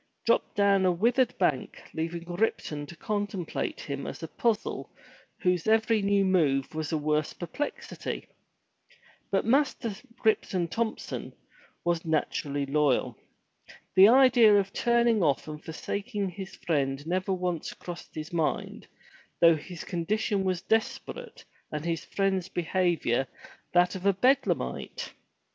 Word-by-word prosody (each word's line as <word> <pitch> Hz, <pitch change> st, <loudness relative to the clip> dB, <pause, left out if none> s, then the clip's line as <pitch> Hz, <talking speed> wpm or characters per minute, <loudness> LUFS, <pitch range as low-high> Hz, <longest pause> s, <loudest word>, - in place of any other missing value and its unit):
'' -, -, -48 dB
dropped -, -, +2 dB
down 200 Hz, -1 st, +4 dB
on -, -, +3 dB
a -, -, +4 dB
withered 240 Hz, +7 st, +2 dB
bank, -, -, 0 dB
leaving 165 Hz, +1 st, -3 dB
Ripton 175 Hz, -5 st, -2 dB
to 170 Hz, -, -10 dB
contemplate 205 Hz, -1 st, -3 dB
him 140 Hz, -1 st, -5 dB
as -, -, -7 dB
a -, -, -3 dB
puzzle 225 Hz, +2 st, -1 dB, 0.5 s
whose 180 Hz, -1 st, +1 dB
every 220 Hz, 0 st, +3 dB
new 200 Hz, 0 st, +3 dB
move 150 Hz, -8 st, +2 dB
was 155 Hz, 0 st, -3 dB
a 160 Hz, -, +1 dB
worse 150 Hz, 0 st, 0 dB
perplexity. 235 Hz, +12 st, -5 dB, 1.0 s
But 195 Hz, -, +1 dB
Master 255 Hz, -3 st, +2 dB, 0.3 s
Ripton 185 Hz, -5 st, +2 dB
Thompson 225 Hz, +3 st, -3 dB, 0.5 s
was 170 Hz, -1 st, +1 dB
naturally 145 Hz, -3 st, -1 dB
loyal. 145 Hz, -1 st, +1 dB, 0.8 s
The 190 Hz, +1 st, +9 dB
idea 245 Hz, -3 st, +7 dB
of 195 Hz, 0 st, -3 dB
turning 235 Hz, -2 st, +3 dB
off 145 Hz, -4 st, +1 dB
and 150 Hz, 0 st, -7 dB
forsaking 200 Hz, +5 st, -3 dB
his 190 Hz, +1 st, -8 dB
friend 140 Hz, -3 st, -1 dB
never 185 Hz, +3 st, -1 dB
once 180 Hz, -3 st, -2 dB
crossed 175 Hz, -1 st, -9 dB
his 155 Hz, +1 st, -6 dB
mind, 165 Hz, -2 st, -2 dB, 0.5 s
though 165 Hz, -1 st, +7 dB
his 165 Hz, +2 st, -8 dB
condition 195 Hz, +3 st, -1 dB
was 185 Hz, -1 st, -1 dB
desperate, 225 Hz, -, -2 dB, 0.3 s
and 150 Hz, +1 st, -4 dB
his 165 Hz, -1 st, -2 dB
friend's 190 Hz, -2 st, 0 dB
behavior 170 Hz, -8 st, +1 dB, 0.5 s
that 180 Hz, 0 st, +4 dB
of 190 Hz, +1 st, -2 dB
a 200 Hz, -, +5 dB
Bedlamite. 255 Hz, +9 st, 0 dB
180 Hz, 135 wpm, -28 LUFS, 160-210 Hz, 1.0 s, The